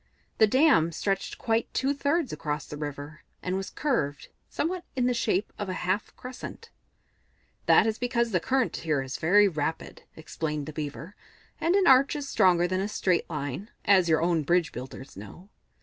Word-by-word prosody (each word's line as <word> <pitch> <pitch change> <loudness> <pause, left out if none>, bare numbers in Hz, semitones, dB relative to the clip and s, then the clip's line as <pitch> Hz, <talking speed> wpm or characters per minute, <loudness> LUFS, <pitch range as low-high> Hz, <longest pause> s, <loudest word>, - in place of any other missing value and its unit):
The 220 - +7
dam 260 - +4
stretched 195 +4 -2
quite 225 0 -1
two 270 +2 +1
thirds 285 - 0
across 150 0 -3
the 150 - -8
river, 145 +1 -7 0.2
and 185 0 -1
was 195 0 -3
curved, 150 - -2 0.2
somewhat 350 +3 -2
in 250 -2 +1
the 250 - +2
shape 210 -4 -1
of 205 -2 -3
a - - -2
half 190 +4 -1
crescent. 260 - -9 1.0
"That - - +6
is 220 -1 -1
because 235 -1 0
the 180 - +2
current 260 +5 0
here 155 -4 -1
is 130 0 -5
very 205 +6 +5
rapid," 160 -2 -3
explained 150 -2 -4
the 155 - -8
Beaver, 155 +5 -6 0.4
"and 340 +3 +2
an 395 -2 +3
arch 270 0 +5
is 290 -2 -4
stronger 180 -8 +3
than 185 +1 -1
a 200 - -1
straight 185 -4 0
line, 150 - -4 0.2
as 185 -4 +4
your 160 0 +3
own 170 -2 +2
bridge 170 0 +1
builders 130 +2 -9
know. 105 - -11
185 Hz, 180 wpm, -27 LUFS, 155-245 Hz, 1.0 s, The